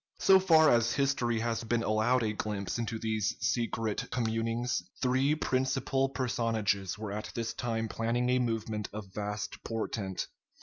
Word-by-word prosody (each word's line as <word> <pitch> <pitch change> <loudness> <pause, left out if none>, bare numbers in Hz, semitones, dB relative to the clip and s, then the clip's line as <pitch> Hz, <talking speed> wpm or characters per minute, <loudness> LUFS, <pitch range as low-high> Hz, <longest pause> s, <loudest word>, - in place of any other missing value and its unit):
So 190 0 +6
far 160 -5 +6
as 115 -1 +3
history 125 -5 +1
has 115 -1 -1
been 115 0 0
allowed 110 +4 +2
a 105 -1 0
glimpse 105 0 -3
into 115 -1 -2
these 110 -1 -1
secret 115 -2 -1
communings, 115 -1 -1 0.2
three 130 +4 +2
principal 135 -1 0
personages 115 -7 -1
were 105 -1 -5
at 105 +1 -4
this 115 -1 -2
time 115 -2 -2
planning 115 +3 0
a 125 - +3
movement 110 -3 -2
of 100 -3 -7
vast 105 0 -4
portent. 110 -4 -3
115 Hz, 145 wpm, -31 LUFS, 110-125 Hz, 0.2 s, So